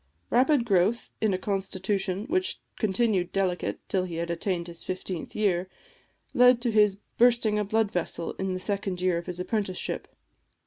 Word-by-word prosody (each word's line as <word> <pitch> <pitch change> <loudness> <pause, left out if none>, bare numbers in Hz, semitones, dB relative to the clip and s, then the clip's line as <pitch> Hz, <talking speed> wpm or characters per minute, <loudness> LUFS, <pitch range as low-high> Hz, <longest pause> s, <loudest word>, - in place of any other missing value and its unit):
Rapid 260 0 +4
growth 205 +2 +2
in 220 -2 +3
a 185 - +1
constitution 195 0 -2
which 365 +6 0 0.2
continued 200 -3 +1
delicate 185 -2 -1
till 185 -1 0
he 175 -2 -6
had 170 +1 -2
attained 170 0 -1
his 170 -1 -8
fifteenth 185 -2 -5
year, 185 -3 +1 0.6
led 250 0 +6
to 240 -1 +1
his 210 -2 +4 0.2
bursting 235 -3 +4
a - - +1
blood 220 0 +1
vessel 170 -1 -2
in 190 -1 -1
the 185 - -3
second 195 -1 -2
year 180 -2 +1
of 170 - -10
his 180 0 -4
apprenticeship. 195 -1 -2
195 Hz, 165 wpm, -27 LUFS, 180-220 Hz, 0.6 s, led